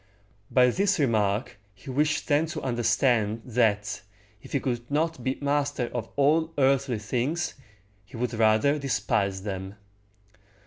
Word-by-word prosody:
By 125 -1 +4
this 195 +5 +1
remark 110 -4 0 0.2
he 100 +7 -9
wished 150 +4 0
them 150 +2 +2
to 165 - -5
understand, 115 -2 +1
that, 110 -4 0 0.4
if - - -14
he 140 - +2
could 120 -2 -3
not 165 +3 -1
be 130 0 -1
master 145 -3 -1
of 115 -2 -4
all 155 +3 +2
earthly 135 -2 +2
things, 125 +10 -2 0.5
he 100 - -12
would 125 0 -2
rather 110 +6 +3
despise 100 -6 -1
them. 95 -1 -5
125 Hz, 135 wpm, -26 LUFS, 110-145 Hz, 0.5 s, By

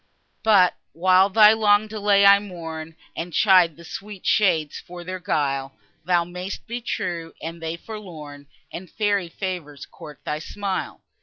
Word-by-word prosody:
But, 200 -5 +4 0.2
while 185 +3 +4
thy 210 +1 +7
long 210 -1 +3
delay 205 -2 +2
I 200 0 +8
mourn, 165 -5 -8 0.2
And 170 0 -5
chide 180 -6 +4
the 170 - -13
sweet 200 +2 -9
shades 170 -8 +2
for 175 0 -10
their 185 +1 -6
guile, 140 -7 -2 0.3
Thou 175 -1 +2
may'st 180 +3 -7
be 240 +1 -5
true, 170 -7 -4
and 165 +1 -7
they 165 +1 -4
forlorn, 160 -9 -10 0.2
And 180 +1 -8
fairy 205 -4 0
favours 165 -6 -6
court 150 -1 -13
thy 150 - -2
smile. 195 +4 -4
180 Hz, 150 wpm, -23 LUFS, 165-200 Hz, 0.3 s, I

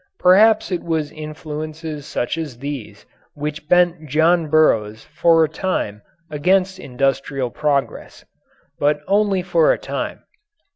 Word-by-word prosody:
Perhaps 210 +4 +4
it 180 - -1
was 160 -3 -2
influences 155 0 -7
such 120 - -2
as 155 -7 -6
these 140 -3 -7 0.3
which 150 +1 -5
bent 175 -3 +3
John 160 +3 +3
Burroughs 110 -9 +2
for 165 +2 +3
a - - +2
time 150 - -3 0.3
against 185 +5 +1
industrial 135 -2 -2
progress. 145 0 -2 0.5
But 145 +1 +1
only 200 -1 +2
for - - +3
a - - +1
time. - - -5
155 Hz, 125 wpm, -20 LUFS, 145-180 Hz, 0.5 s, Perhaps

